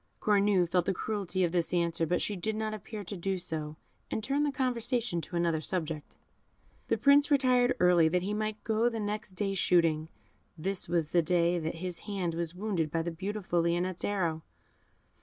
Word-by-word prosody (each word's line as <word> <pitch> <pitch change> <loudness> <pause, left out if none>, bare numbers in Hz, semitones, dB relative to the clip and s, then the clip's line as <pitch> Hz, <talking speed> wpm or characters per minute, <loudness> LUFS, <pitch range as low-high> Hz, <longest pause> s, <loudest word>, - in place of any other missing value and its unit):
Cornue 200 -3 +3
felt 175 0 +1
the 195 - 0
cruelty 195 -3 -2
of 170 - +1
this 175 0 0
answer, 170 -1 +1
but 175 - +1
she 210 - 0
did 215 +4 -2
not 215 0 -2
appear 215 0 -7
to 200 +2 -6
do 190 +1 -2
so, 155 -4 -4 0.3
and 220 - -3
turned 280 +5 +1
the - - 0
conversation 245 -7 -1
to 175 - -8
another 170 -2 +1
subject. 160 -3 -4 0.7
The - - +1
Prince 285 +1 +5
retired 255 -3 +3
early, 175 -2 +5
that 180 +2 +1
he 200 +2 -2
might 215 0 -3
go 225 +2 +2
the 230 -1 -4
next 210 -1 -3
day 195 +1 -1
shooting. 165 -4 +2 0.5
This 190 +2 -2
was 170 -3 0
the 175 - +4
day 170 +1 +2
that 160 0 -3
his 175 0 -4
hand 185 -4 -1
was 170 0 -3
wounded 185 -5 -1
by 165 +2 -1
the 170 - -3
beautiful 185 0 -2
Lionette's 175 +2 -1
arrow. 170 -6 -1
180 Hz, 190 wpm, -30 LUFS, 170-215 Hz, 0.7 s, Prince